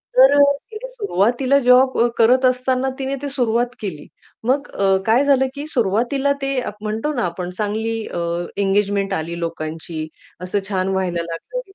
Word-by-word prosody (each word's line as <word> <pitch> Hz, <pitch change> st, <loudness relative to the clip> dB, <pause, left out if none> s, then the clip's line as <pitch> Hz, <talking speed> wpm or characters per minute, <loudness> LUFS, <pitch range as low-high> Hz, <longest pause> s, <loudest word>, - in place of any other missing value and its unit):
तर -, -, +7 dB
अ, -, -, +8 dB, 0.3 s
तिने 440 Hz, +3 st, -7 dB
सुरुवातीला 265 Hz, -, +1 dB
जॉब 260 Hz, +1 st, +6 dB, 0.2 s
करत 255 Hz, +3 st, +4 dB
असताना 255 Hz, +1 st, +1 dB
तिने 270 Hz, +1 st, -2 dB
ते 285 Hz, -, -3 dB
सुरुवात 240 Hz, -1 st, +1 dB
केली. 180 Hz, -8 st, -6 dB, 0.4 s
मग 275 Hz, +3 st, +1 dB
अ, 195 Hz, -1 st, +2 dB
काय 230 Hz, +5 st, +4 dB
झालं, 270 Hz, -2 st, +3 dB
की 285 Hz, +1 st, -5 dB
सुरुवातीला 245 Hz, +4 st, +1 dB
ते 275 Hz, -1 st, 0 dB
आप 210 Hz, -, -11 dB
म्हणतो 220 Hz, +8 st, -2 dB
ना 240 Hz, -, -1 dB
आपण 180 Hz, +1 st, -4 dB
चांगली 220 Hz, +2 st, -1 dB
अ, -, -, -5 dB, 0.4 s
एंगेजमेंट 200 Hz, 0 st, +1 dB
आली 170 Hz, 0 st, -3 dB
लोकांची 160 Hz, -1 st, -5 dB, 0.3 s
असं 185 Hz, +3 st, -1 dB
छान 185 Hz, -2 st, 0 dB
व्हायला 175 Hz, -3 st, -1 dB
लागलं 170 Hz, -, -5 dB
225 Hz, 160 wpm, -20 LUFS, 190-265 Hz, 0.4 s, अ